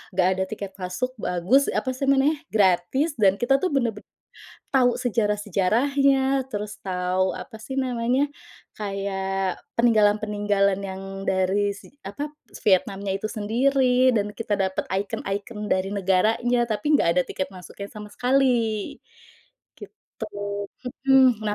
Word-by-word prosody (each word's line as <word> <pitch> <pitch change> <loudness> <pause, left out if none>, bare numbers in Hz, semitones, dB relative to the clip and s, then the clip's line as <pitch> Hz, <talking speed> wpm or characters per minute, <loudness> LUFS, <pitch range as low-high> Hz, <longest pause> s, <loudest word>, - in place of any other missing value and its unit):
nggak 185 -1 +3
ada 190 0 -1
tiket 200 -3 -6
masuk, 185 +8 -2
bagus, 195 +11 +2
apa 260 - -1
sih, 270 +2 -3
namanya, 275 +3 +3
gratis. 205 - +2
Dan 195 -2 +4
kita 270 +3 +2
tuh 370 - +1
bener-ben 235 -8 -1 0.7
tahu 250 -3 +2
sejarah-sejarahnya, 250 +5 +1
terus 210 +1 -4
tahu 185 0 0
apa 225 - -8
sih 220 +5 -8
namanya, 250 +2 0 0.5
kayak 195 -2 -2 0.2
peninggalan-peninggalan 205 -3 +3
yang 190 0 -6 0.2
dari 190 +2 +1
si, 205 +7 -15
apa 205 +10 -5 0.4
Vietnamnya 195 0 +2
itu 195 - -11
sendiri. 255 +4 +2
Dan 210 -2 -1
kita 225 -2 -4
dapat 190 0 0
ikon-ikon 200 +2 -3
dari 185 +1 0
negaranya, 210 +6 +2
tapi 265 +8 0
nggak 285 - +4
ada 180 - +5
tiket 185 - -3
masuknya 185 +2 -9
sama 210 -1 -9
sekali, 245 -5 +1 0.8
gitu. - - -10 0.8
Hmm, 260 -3 +6
nah 210 - 0
210 Hz, 125 wpm, -24 LUFS, 195-255 Hz, 0.8 s, Hmm